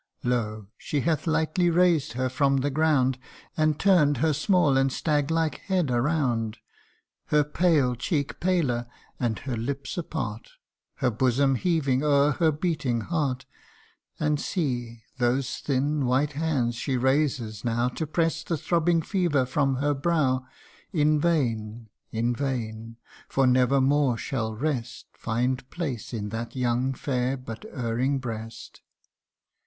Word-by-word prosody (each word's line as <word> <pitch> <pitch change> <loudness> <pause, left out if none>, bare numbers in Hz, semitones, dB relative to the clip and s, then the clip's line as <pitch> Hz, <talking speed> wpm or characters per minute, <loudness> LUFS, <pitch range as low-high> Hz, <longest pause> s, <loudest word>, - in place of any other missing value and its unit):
Lo! 110 -4 -1
she 145 - -2
hath 165 +1 0
lightly 160 +3 +2
raised 170 -7 +3
her 130 +1 0
from 135 +2 +2
the 140 +2 0
ground, 135 -4 +2 0.4
And 155 -1 +1
turn'd 160 -8 +4
her 155 +4 +2
small 155 -1 +3
and 135 0 +3
stag 150 0 0
like 160 -1 0
head 180 -8 0
around; 120 -4 0 0.7
Her 150 0 +3
pale 150 -4 +2
cheek 140 - -2
paler, 150 -10 +1 0.3
and 115 -4 0
her 130 -2 -4
lips 135 +8 -4
apart, 115 -10 -5 0.4
Her 125 - 0
bosom 130 +4 +2
heaving 135 -3 +1
o'er 145 0 +4
her 160 +2 +2
beating 150 -7 -1
heart: 140 -4 -2 0.7
And 150 -1 +1
see, 120 - -3 0.2
those 125 +2 0
thin 140 0 0
white 140 +4 +1
hands 140 -6 0
she 130 +1 -1
raises 130 -5 0
now 120 0 +1
To 155 +5 -4
press 165 +1 0
the 165 - -2
throbbing 170 +1 +1
fever 170 -8 +1
from 135 +1 +1
her 145 +3 +1
brow 145 -3 +1
CANTO 130 - -22 0.5
I. - - +1
In 150 +1 +4
vain 115 -9 -1 0.2
in 115 +2 0
vain! 115 -4 -4 0.3
for 135 - +2
never 130 +2 +4
more 135 -2 +2
shall 110 -3 -3
rest 125 -2 -3
Find 125 +3 -2
place 140 - -4
in 105 -4 -4
that 115 +3 -5
young, 125 +1 0
fair, 130 0 -1
but 115 -3 -8
erring 125 +3 0
breast 115 -3 -7
135 Hz, 140 wpm, -26 LUFS, 120-155 Hz, 0.7 s, turn'd